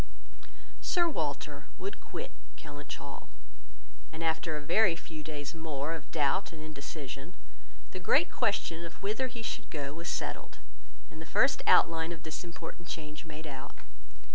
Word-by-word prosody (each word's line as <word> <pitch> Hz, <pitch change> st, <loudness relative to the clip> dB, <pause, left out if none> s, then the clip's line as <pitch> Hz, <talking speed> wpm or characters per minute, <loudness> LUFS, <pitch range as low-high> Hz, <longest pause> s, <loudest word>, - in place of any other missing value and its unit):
Sir 345 Hz, -2 st, +4 dB
Walter 145 Hz, -, -1 dB
would 395 Hz, -, -4 dB
quit -, -, -5 dB, 0.2 s
Kellynch 145 Hz, -1 st, -6 dB
Hall; -, -, -7 dB, 0.8 s
and 160 Hz, +1 st, -4 dB
after 160 Hz, -1 st, +2 dB
a -, -, -4 dB
very 175 Hz, +4 st, +6 dB
few 160 Hz, -2 st, -7 dB
days 145 Hz, -1 st, -3 dB
more 160 Hz, -2 st, -1 dB
of 160 Hz, -3 st, -6 dB
doubt 155 Hz, +5 st, +3 dB
and 160 Hz, -, -8 dB
indecision, 150 Hz, 0 st, -6 dB, 0.6 s
the 185 Hz, -, -4 dB
great 175 Hz, 0 st, +5 dB
question 170 Hz, -5 st, +1 dB
of 170 Hz, +2 st, -8 dB
whither 215 Hz, +6 st, +2 dB
he 235 Hz, -2 st, -6 dB
should -, -, -2 dB
go 140 Hz, -2 st, -2 dB
was 170 Hz, +2 st, -3 dB
settled, -, -, -2 dB, 0.5 s
and 160 Hz, -, -8 dB
the 160 Hz, -, -7 dB
first 275 Hz, +1 st, +5 dB
outline 165 Hz, 0 st, +7 dB
of 165 Hz, -2 st, -6 dB
this 160 Hz, +2 st, -3 dB
important 170 Hz, 0 st, -7 dB
change 150 Hz, 0 st, -4 dB
made 155 Hz, 0 st, -7 dB
out. 135 Hz, -3 st, -6 dB
160 Hz, 155 wpm, -33 LUFS, 150-170 Hz, 0.8 s, outline